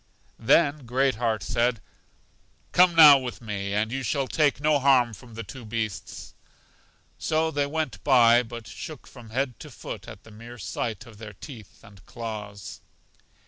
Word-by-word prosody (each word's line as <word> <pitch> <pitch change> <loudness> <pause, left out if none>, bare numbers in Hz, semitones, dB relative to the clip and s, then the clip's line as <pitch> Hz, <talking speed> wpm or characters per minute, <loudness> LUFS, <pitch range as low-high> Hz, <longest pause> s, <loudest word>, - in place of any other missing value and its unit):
Then 140 +2 +2
Great 130 +2 +2
heart 115 -3 -1
said, 115 +1 0 0.9
Come 180 -1 +5
now 150 -4 +9
with 125 -2 -6
me, 100 -3 -4
and 110 +2 0
you 135 +2 -3
shall 135 +1 -1
take 150 -1 +1
no 150 0 +2
harm 130 -4 +3
from 115 0 -13
the 115 - -6
two 130 0 -10
beasts. 110 -5 -5 0.9
So 160 0 0
they 145 -2 0
went 155 +1 -4
by, 120 -3 +5
but 115 -1 -9
shook 155 -4 -9
from 120 -4 -14
head 130 +1 -2
to - - -10
foot - - -9
at 100 - -11
the 110 - -16
mere 115 +3 -11
sight 115 +3 -4
of 110 -4 -15
their 105 -2 -9
teeth 110 0 -13
and 100 -2 -17
claws. 105 -5 -7
120 Hz, 165 wpm, -25 LUFS, 110-140 Hz, 0.9 s, now